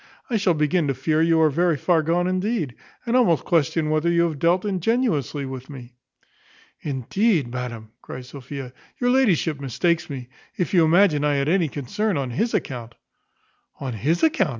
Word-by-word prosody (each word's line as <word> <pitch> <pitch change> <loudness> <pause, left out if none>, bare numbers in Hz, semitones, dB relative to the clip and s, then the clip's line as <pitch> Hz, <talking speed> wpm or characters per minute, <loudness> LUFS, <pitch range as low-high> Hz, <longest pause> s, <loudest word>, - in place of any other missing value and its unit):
I 230 - +2
shall 190 -4 +2
begin 150 +2 +1
to 135 - 0
fear 155 +5 0
you 165 0 +3
are 155 -1 +4
very 170 +1 +1
far 165 +4 +2
gone 170 +3 +1
indeed; 185 - -1 0.3
and 235 0 0
almost 200 - +3
question 160 -2 +1
whether 155 +2 +1
you 170 0 +3
have 160 -4 -2
dealt 175 +5 +2
ingenuously 185 - 0
with 130 -1 -8
me." 125 -4 -10 0.9
"Indeed, 145 - 0
madam," 120 -3 -6
cries 125 0 -9
Sophia, 135 -1 -8 0.3
"your 245 0 +2
ladyship 185 - +2
mistakes 160 +7 0
me, 130 -4 -6 0.3
if 180 - -2
you 175 -3 +5
imagine 160 -3 +4
I 145 -1 +2
had 140 0 0
any 175 0 +2
concern 200 - -2
on 135 -3 -3
his 225 - -1
account." 120 -3 -4 0.8
"On 130 -3 -4
his 145 - 0
account!" 300 - +3
160 Hz, 175 wpm, -23 LUFS, 135-185 Hz, 0.9 s, you